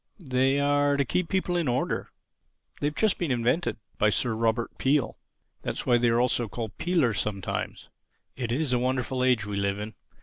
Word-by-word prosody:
They 135 Hz, +2 st, +3 dB
are 145 Hz, 0 st, +3 dB
to 140 Hz, -, +2 dB
keep 180 Hz, +6 st, -1 dB
people 185 Hz, -2 st, 0 dB
in 170 Hz, -4 st, +1 dB
order. 125 Hz, +1 st, -1 dB, 0.7 s
They've 150 Hz, +1 st, -1 dB
just 215 Hz, +1 st, +2 dB
been 175 Hz, -, -1 dB
invented—by 120 Hz, -3 st, 0 dB
Sir 115 Hz, +3 st, +1 dB
Robert 115 Hz, +1 st, 0 dB
Peel. 135 Hz, 0 st, +1 dB, 0.4 s
That's -, -, -3 dB
why 120 Hz, -1 st, +4 dB
they 120 Hz, 0 st, +3 dB
are 115 Hz, +1 st, +3 dB
also 120 Hz, -1 st, +2 dB
called 110 Hz, -1 st, -6 dB
'peelers' 160 Hz, -, +2 dB
sometimes. 100 Hz, -2 st, -3 dB, 0.5 s
It 120 Hz, -3 st, -3 dB
is 135 Hz, +1 st, 0 dB
a 125 Hz, -, +3 dB
wonderful 130 Hz, 0 st, 0 dB
age 125 Hz, -5 st, +3 dB
we 105 Hz, -1 st, -3 dB
live 100 Hz, 0 st, 0 dB
in. 105 Hz, +1 st, -6 dB
125 Hz, 175 wpm, -27 LUFS, 115-145 Hz, 0.7 s, why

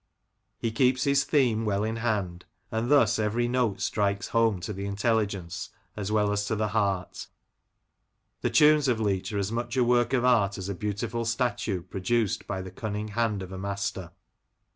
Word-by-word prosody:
He 115 Hz, -, -2 dB
keeps 125 Hz, +2 st, +2 dB
his 140 Hz, 0 st, +3 dB
theme 120 Hz, -7 st, +2 dB
well 105 Hz, -1 st, 0 dB
in 110 Hz, +1 st, -2 dB
hand, 100 Hz, -7 st, -2 dB, 0.3 s
and 115 Hz, +2 st, -1 dB
thus 115 Hz, -7 st, +4 dB
every 110 Hz, +3 st, +1 dB
note 120 Hz, -5 st, 0 dB
strikes 100 Hz, -1 st, 0 dB
home 115 Hz, -4 st, +2 dB
to 105 Hz, -, -4 dB
the 100 Hz, +1 st, -5 dB
intelligence 100 Hz, -3 st, -1 dB, 0.3 s
as 105 Hz, -1 st, -4 dB
well 105 Hz, -1 st, +2 dB
as 100 Hz, 0 st, 0 dB
to 110 Hz, -, -1 dB
the 105 Hz, 0 st, -1 dB
heart 100 Hz, -3 st, -1 dB, 1.1 s
The -, -, +1 dB
tunes 150 Hz, -1 st, +5 dB
of 120 Hz, -3 st, +1 dB
Leach 100 Hz, -3 st, -1 dB
are 105 Hz, -, -2 dB
as 100 Hz, +1 st, -1 dB
much 120 Hz, +2 st, -3 dB
a 125 Hz, -, +4 dB
work 120 Hz, 0 st, +2 dB
of 125 Hz, -1 st, +2 dB
art 105 Hz, -6 st, +3 dB
as 95 Hz, 0 st, -5 dB
a -, -, -1 dB
beautiful 105 Hz, +4 st, -3 dB
statue 115 Hz, -5 st, -1 dB
produced 95 Hz, +4 st, -1 dB
by 95 Hz, -1 st, -3 dB
the 95 Hz, -, -8 dB
cunning 105 Hz, +2 st, -4 dB
hand 105 Hz, -3 st, -1 dB
of 95 Hz, -, -9 dB
a 95 Hz, -, -6 dB
master. 100 Hz, -2 st, -3 dB
105 Hz, 185 wpm, -27 LUFS, 100-120 Hz, 1.1 s, tunes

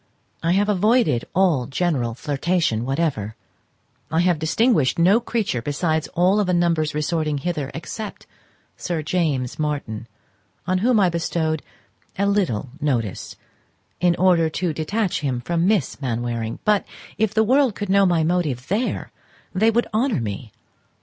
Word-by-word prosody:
I 165 Hz, +1 st, +2 dB
have 205 Hz, +2 st, +2 dB
avoided 210 Hz, -, +2 dB
all 170 Hz, -10 st, +2 dB
general 135 Hz, -6 st, -1 dB
flirtation 145 Hz, -4 st, 0 dB
whatever; 135 Hz, -7 st, -1 dB, 0.7 s
I 160 Hz, +1 st, +2 dB
have 175 Hz, -3 st, +2 dB
distinguished 160 Hz, -, +2 dB
no 185 Hz, +7 st, +5 dB
creature 220 Hz, -, -2 dB
besides, 155 Hz, +4 st, -1 dB
of -, -, -23 dB
all 190 Hz, +4 st, +3 dB
the 180 Hz, -2 st, +1 dB
numbers 165 Hz, -3 st, +1 dB
resorting 150 Hz, -1 st, 0 dB
hither, 150 Hz, -2 st, -3 dB
except 205 Hz, +6 st, -7 dB, 0.5 s
Sir 170 Hz, -3 st, -3 dB
James 150 Hz, -6 st, -1 dB
Martin, 140 Hz, -7 st, -3 dB, 0.6 s
on 185 Hz, +1 st, +1 dB
whom 235 Hz, +2 st, +3 dB
I 190 Hz, -3 st, +4 dB
bestowed 165 Hz, -2 st, -1 dB, 0.6 s
a 200 Hz, -, +1 dB
little 185 Hz, -, 0 dB
notice, 120 Hz, -9 st, -2 dB, 0.6 s
in 175 Hz, -1 st, +3 dB
order 170 Hz, -3 st, +3 dB
to 170 Hz, +1 st, -2 dB
detach 185 Hz, +6 st, -1 dB
him 135 Hz, -5 st, -1 dB
from 170 Hz, +7 st, 0 dB
Miss 195 Hz, -8 st, 0 dB
Mainwaring; 120 Hz, -2 st, -2 dB
but, 210 Hz, -1 st, +3 dB, 0.4 s
if 215 Hz, -1 st, +1 dB
the 220 Hz, -, +4 dB
world 255 Hz, -1 st, +3 dB
could 205 Hz, -, -4 dB
know 195 Hz, 0 st, +5 dB
my 170 Hz, -3 st, +2 dB
motive 155 Hz, -7 st, -1 dB
there 220 Hz, +7 st, -1 dB, 0.4 s
they 215 Hz, +4 st, +3 dB
would 235 Hz, +2 st, +2 dB
honour 230 Hz, -, +1 dB
me. 110 Hz, 0 st, -5 dB
170 Hz, 145 wpm, -22 LUFS, 140-195 Hz, 0.7 s, no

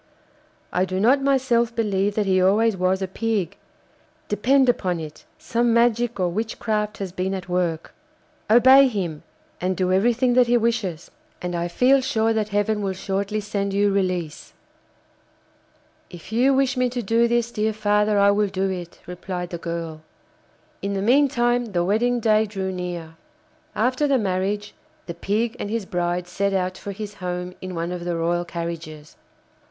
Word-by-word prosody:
I 180 Hz, -, +2 dB
do 185 Hz, 0 st, -2 dB
not 255 Hz, +7 st, +4 dB
myself 250 Hz, -4 st, +1 dB
believe 205 Hz, -3 st, 0 dB
that 210 Hz, -, +1 dB
he 185 Hz, -1 st, +2 dB
always 210 Hz, +4 st, +3 dB
was 185 Hz, +1 st, 0 dB
a -, -, -2 dB
pig. 205 Hz, -2 st, -2 dB, 0.7 s
Depend 260 Hz, +6 st, +3 dB
upon 185 Hz, -8 st, +1 dB
it 155 Hz, -1 st, -9 dB
some 235 Hz, 0 st, 0 dB
magic 235 Hz, -1 st, +2 dB
or 180 Hz, -, +2 dB
witchcraft 215 Hz, +1 st, -2 dB
has 195 Hz, -3 st, -5 dB
been 185 Hz, +2 st, -2 dB
at 185 Hz, -1 st, -7 dB
work. 175 Hz, -3 st, -2 dB, 0.6 s
Obey 260 Hz, +4 st, +7 dB
him, 180 Hz, -10 st, -3 dB, 0.4 s
and 185 Hz, 0 st, -1 dB
do 185 Hz, -1 st, +1 dB
everything 240 Hz, +5 st, +2 dB
that 250 Hz, 0 st, +4 dB
he 240 Hz, 0 st, +4 dB
wishes, 225 Hz, -8 st, -2 dB, 0.3 s
and 180 Hz, 0 st, -4 dB
I 170 Hz, 0 st, -1 dB
feel 255 Hz, +9 st, +3 dB
sure 225 Hz, -4 st, +1 dB
that 215 Hz, -1 st, -1 dB
Heaven 210 Hz, +1 st, 0 dB
will 195 Hz, -1 st, -1 dB
shortly 200 Hz, +3 st, -2 dB
send 200 Hz, -1 st, -3 dB
you 205 Hz, 0 st, +3 dB
release.' 185 Hz, -5 st, -2 dB, 1.6 s
'If 175 Hz, +3 st, -12 dB
you 245 Hz, +5 st, +3 dB
wish 270 Hz, 0 st, +2 dB
me 250 Hz, -1 st, +1 dB
to 245 Hz, 0 st, -4 dB
do 230 Hz, +3 st, +2 dB
this, 235 Hz, 0 st, 0 dB
dear 215 Hz, -1 st, 0 dB
father, 210 Hz, 0 st, +1 dB
I 200 Hz, 0 st, +5 dB
will 205 Hz, +1 st, +2 dB
do 190 Hz, 0 st, -1 dB
it,' 175 Hz, -2 st, -7 dB
replied 180 Hz, 0 st, -6 dB
the 170 Hz, -, -5 dB
girl. 165 Hz, -2 st, -5 dB, 0.8 s
In 200 Hz, +1 st, -2 dB
the 195 Hz, -, -1 dB
meantime 245 Hz, -1 st, +3 dB
the 175 Hz, -1 st, +1 dB
wedding 240 Hz, +5 st, +1 dB
day 220 Hz, -1 st, +3 dB
drew 195 Hz, -2 st, -4 dB
near. 175 Hz, -3 st, -6 dB, 0.6 s
After 255 Hz, +6 st, +1 dB
the 275 Hz, -2 st, +3 dB
marriage, 200 Hz, 0 st, -2 dB, 0.3 s
the 170 Hz, -, -5 dB
Pig 215 Hz, +7 st, -1 dB
and 205 Hz, -, -4 dB
his 225 Hz, -2 st, -2 dB
bride 175 Hz, 0 st, -2 dB
set 200 Hz, +2 st, -1 dB
out 185 Hz, -1 st, -1 dB
for 200 Hz, -, -7 dB
his 205 Hz, +1 st, -7 dB
home 180 Hz, -2 st, -5 dB
in 185 Hz, -1 st, -6 dB
one 170 Hz, +1 st, -3 dB
of 180 Hz, -1 st, -5 dB
the 175 Hz, -1 st, -2 dB
royal 170 Hz, +1 st, 0 dB
carriages. 165 Hz, -3 st, -7 dB
200 Hz, 170 wpm, -23 LUFS, 180-230 Hz, 1.6 s, Obey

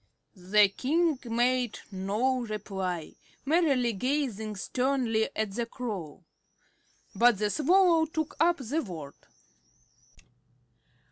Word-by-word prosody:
The 200 Hz, +3 st, +4 dB
King 305 Hz, -, 0 dB
made 240 Hz, 0 st, +1 dB
no 210 Hz, +7 st, 0 dB
reply, 195 Hz, -7 st, -4 dB, 0.3 s
merely 275 Hz, -7 st, +2 dB
gazing 225 Hz, -2 st, -2 dB
sternly 245 Hz, +1 st, 0 dB
at 215 Hz, -2 st, -1 dB
the 230 Hz, +3 st, -3 dB
Crow. 200 Hz, -, -6 dB, 0.9 s
But 240 Hz, -2 st, +4 dB
the 210 Hz, +1 st, 0 dB
Swallow 335 Hz, -, +4 dB
took 315 Hz, -1 st, -3 dB
up 340 Hz, +1 st, +3 dB
the 270 Hz, +6 st, -2 dB
word. 160 Hz, -, -8 dB
235 Hz, 95 wpm, -28 LUFS, 205-275 Hz, 0.9 s, The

